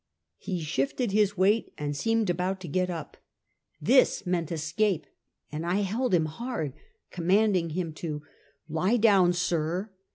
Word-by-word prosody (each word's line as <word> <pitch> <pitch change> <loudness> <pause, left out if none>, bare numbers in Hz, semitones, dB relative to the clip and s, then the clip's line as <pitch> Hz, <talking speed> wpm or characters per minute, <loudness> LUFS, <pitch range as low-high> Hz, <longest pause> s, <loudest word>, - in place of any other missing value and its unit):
He 180 -3 -3
shifted 155 - -1
his 205 -1 +2
weight 205 +5 +2
and 145 -1 -3
seemed 225 +2 +1
about 180 +2 -1
to 180 - -7
get 185 +4 0
up. 170 -2 -6 0.6
This 260 -4 +4
meant 175 -3 -1
escape, 165 +2 0 0.5
and 155 +2 -4
I 180 +4 +1
held 210 +2 +1
him 160 -2 +2
hard, 160 - -4 0.4
commanding 185 0 +2
him 165 0 -3
to 150 -3 -4 0.4
"lie 180 +9 +1
down, 200 -6 +5
sir." 175 +2 -1
180 Hz, 140 wpm, -28 LUFS, 160-205 Hz, 0.6 s, down